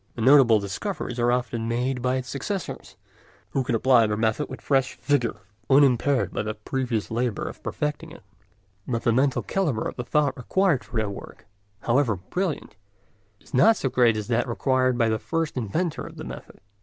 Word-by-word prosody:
The 115 - -5
notable 130 -4 +6
discoveries 120 - -4
are 120 0 +3
often 120 -2 -1
made 125 +2 -1
by 125 +1 +1
his 130 -1 -3
successors, 190 +9 -5 0.6
who 135 - 0
can 120 -1 -1
apply 120 -1 +4
the 105 0 -1
method 110 +6 0
with - - -7
fresh 135 -2 +1
vigour, 135 -7 0 0.3
unimpaired 135 -1 +3
by - - -1
the 110 0 -4
previous 115 0 -3
labour 120 -2 -1
of - - -9
perfecting 150 +2 -3
it; 170 - -13 0.6
but 115 -2 -2
the 115 - +3
mental 130 +2 +2
calibre 155 - -1
of - - -7
the 125 - -3
thought 145 +1 +1
required 170 +2 +1
for - - -7
their 110 -1 +1
work, 100 - -9 0.4
however 120 -2 +2
brilliant, 150 - -4 0.6
is - - -22
not 155 - +5
so 135 - -1
great 120 -3 +3
as 105 - -4
that 120 +1 +1
required 130 +1 +1
by 115 -2 +3
the 110 0 0
first 165 +3 -2
inventor 140 - -2
of - - -12
the - - -7
method. - - -10
125 Hz, 185 wpm, -25 LUFS, 115-140 Hz, 0.6 s, notable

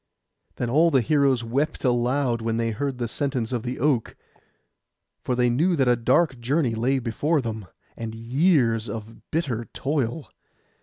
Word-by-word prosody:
Then 120 - -2
all 155 +8 +4
the 135 -5 +3
heroes 135 -1 +2
wept 140 +7 -1
aloud 125 0 +1
when 115 0 -1
they 115 0 0
heard 135 +4 -3
the 120 -1 -2
sentence 130 -3 -2
of 120 -3 -1
the 125 +2 -4
oak; 130 -4 0 1.1
for 125 - -1
they 125 0 +2
knew 160 +10 +2
that 135 -5 +2
a 120 - +5
dark 130 +3 +2
journey 130 +1 0
lay 125 +5 +1
before 135 +6 0
them, 110 -5 -5 0.3
and 115 -1 -6
years 120 - +2
of 110 +1 -8
bitter 130 -8 -2
toil. 140 0 -2
125 Hz, 160 wpm, -24 LUFS, 115-140 Hz, 1.1 s, a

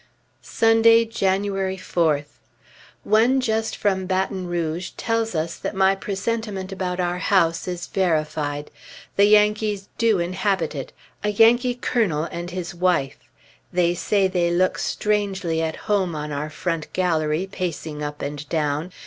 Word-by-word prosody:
Sunday, 225 0 +4
January 195 -2 -1
4th. 155 -5 -1 0.6
One 230 +5 +4
just 225 -3 -1
from 190 -2 0
Baton 190 0 -1
Rouge 175 0 -2
tells 225 -3 -1
us 160 +1 -2
that - - -5
my 190 0 +4
presentiment 200 0 -3
about 185 -1 -3
our 175 0 -1
house 170 -4 +2
is 175 -1 -4
verified; 155 -5 -1 0.4
Yankees 210 0 +3
do 225 -3 +3
inhabit 180 -1 -1
it, 135 -3 -6 0.3
a 210 - +1
Yankee 240 +4 +4
colonel 215 -11 0
and 175 +1 -5
his 175 -1 -5
wife. 175 -6 +1 0.5
They 175 -1 +2
say 195 +2 +1
they 180 -2 +1
look 180 +2 +1
strangely 195 -6 -1
at 160 -1 -2
home 195 -6 +1
on 150 0 -4
our 145 +1 -3
front 165 0 -3
gallery, 165 -1 0
pacing 160 -5 -4
up 145 0 -5
and 145 +1 -5
down.... 155 +2 -1
185 Hz, 135 wpm, -23 LUFS, 165-205 Hz, 0.6 s, Sunday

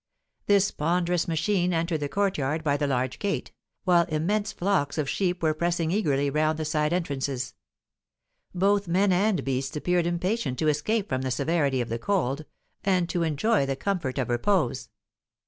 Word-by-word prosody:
This 200 -1 +4
ponderous 175 +2 0
machine 175 +2 +1
entered 165 -1 0
the 145 -1 -3
courtyard 160 -6 0
by 145 -2 +2
the 145 0 0
large 130 -1 -1
gate, 200 -1 -2 0.3
while 175 -2 +4
immense 190 +7 -1
flocks 180 -7 0
of 150 -3 0
sheep 180 +1 -1
were 155 -1 +3
pressing 170 0 0
eagerly 145 -8 +1
round 155 +2 +1
the 160 - -3
side 150 0 0
entrances; 140 -7 -2 1.0
both 200 +2 +2
men 190 +3 +3
and 195 +2 +2
beasts 135 +1 -2
appeared 175 +2 +1
impatient 175 - -1
to 155 - +2
escape 200 +8 0
from 130 0 -1
the 130 - -2
severity 140 0 +1
of 120 - -4
the 115 +1 -2
cold, 155 -5 -1 0.4
and 185 -3 +1
to 175 - -1
enjoy 160 +1 +1
the 135 - -1
comfort 165 -5 -2
of 130 -3 -1
repose. 125 - 0
165 Hz, 165 wpm, -26 LUFS, 140-185 Hz, 1.0 s, This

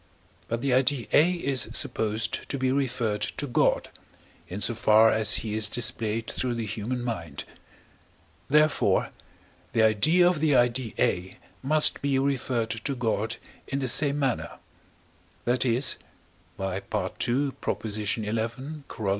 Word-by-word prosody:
But 115 0 -3
the 135 -2 0
idea 130 -1 +2
A 170 +5 +5
is 140 -7 -1
supposed 110 0 0
to 140 - -2
be 130 -1 0
referred 120 -6 -1 0.2
to 145 - -1
God, 125 - +1 0.6
in 95 - -6
so 115 - +1
far 110 0 +4
as 110 -1 +2
he 105 - -3
is 105 -1 +1
displayed 115 -1 -1
through 125 0 -3
the 115 -1 -3
human 115 +4 -4
mind; 85 - -5 1.1
therefore, 150 +1 +2 0.6
the 110 - +3
idea 155 - +4
of 175 -3 +1
the 150 -2 +2
idea 120 -1 +1
A 90 +1 -1 0.2
must 150 +3 +5
be 140 -1 0
referred 130 -4 -1
to 115 +5 -3
God 115 -2 -2 0.3
in 135 - -3
the 135 -1 -2
same 140 +3 +3
manner; 135 -4 -2 0.9
that 125 +2 +1
is 125 +2 +3 0.6
(by 95 -1 -3
II. - - -5 0.4
xi. 135 +3 +1
Coroll.) 110 +4 -3
120 Hz, 140 wpm, -26 LUFS, 110-135 Hz, 1.1 s, A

